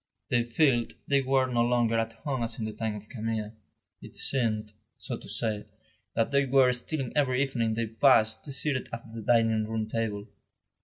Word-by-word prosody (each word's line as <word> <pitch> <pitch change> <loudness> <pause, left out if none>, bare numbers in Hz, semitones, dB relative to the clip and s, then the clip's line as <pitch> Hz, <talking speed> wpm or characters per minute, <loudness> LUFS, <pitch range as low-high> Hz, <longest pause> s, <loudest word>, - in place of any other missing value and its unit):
They 120 -1 +3
felt 120 -1 +2
they 140 -1 +3
were 135 0 +2
no 120 -2 +1
longer 120 -1 +2
at 115 0 -2
home 130 +2 -3
as 115 - -3
in 110 - -3
the 110 - -4
time 110 -1 -3
of 105 0 -9
Camille; 110 -2 -3 0.5
it - - -12
seemed, 110 -5 -1 0.2
so - - -4
to - - -11
say, 105 -2 -2 0.5
that 115 - +1
they 140 0 +4
were 130 -1 +5
stealing 130 +1 -4
every 135 -2 +2
evening 115 -5 -1
they 115 +1 0
passed 110 +2 +3
seated 135 -1 -1
at 115 -1 -8
the 115 - -6
dining 110 -1 +3
room 110 -1 -2
table. 110 -2 -2
115 Hz, 185 wpm, -28 LUFS, 110-130 Hz, 0.5 s, were